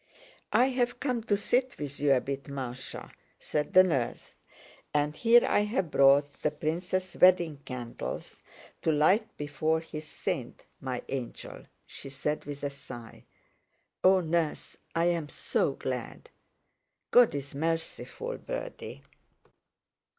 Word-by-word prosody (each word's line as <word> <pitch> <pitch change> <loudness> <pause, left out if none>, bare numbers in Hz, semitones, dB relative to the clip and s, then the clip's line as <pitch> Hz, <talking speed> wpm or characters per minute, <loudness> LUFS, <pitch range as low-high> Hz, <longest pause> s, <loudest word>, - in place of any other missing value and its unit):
"I've 250 -1 +2
come 250 -5 -1
to 205 -3 +2
sit 245 +5 0
with 145 -2 -5
you 145 -1 +4
a 130 - +3
bit, 140 +1 -4
Másha," 135 -2 -6 0.3
said 150 -1 -2
the 185 - +9
nurse, 135 -10 -1 0.6
"and 150 +1 +1
here 235 +4 +6
I've 205 -5 +1
brought 140 +1 +4
the - - +2
prince's 175 +5 -2
wedding 175 -4 +6
candles 125 -3 -6 0.4
to 160 - +2
light 185 +9 +3
before 155 +2 0
his 155 -1 -8
saint, - - -4
my 130 -2 -4
angel," 130 -3 -6 0.2
she 135 - -9
said 150 +3 -2
with 145 0 -7
a 145 - -1
sigh. 130 -4 -11 0.8
"Oh, 185 0 +6
nurse, 165 -2 -1 0.2
I'm 165 -2 +1
so - - 0
glad!" - - -5 0.8
"God 245 -9 +6
is 140 0 -5
merciful, 165 - -3
birdie." - - -6
155 Hz, 120 wpm, -29 LUFS, 140-185 Hz, 0.8 s, the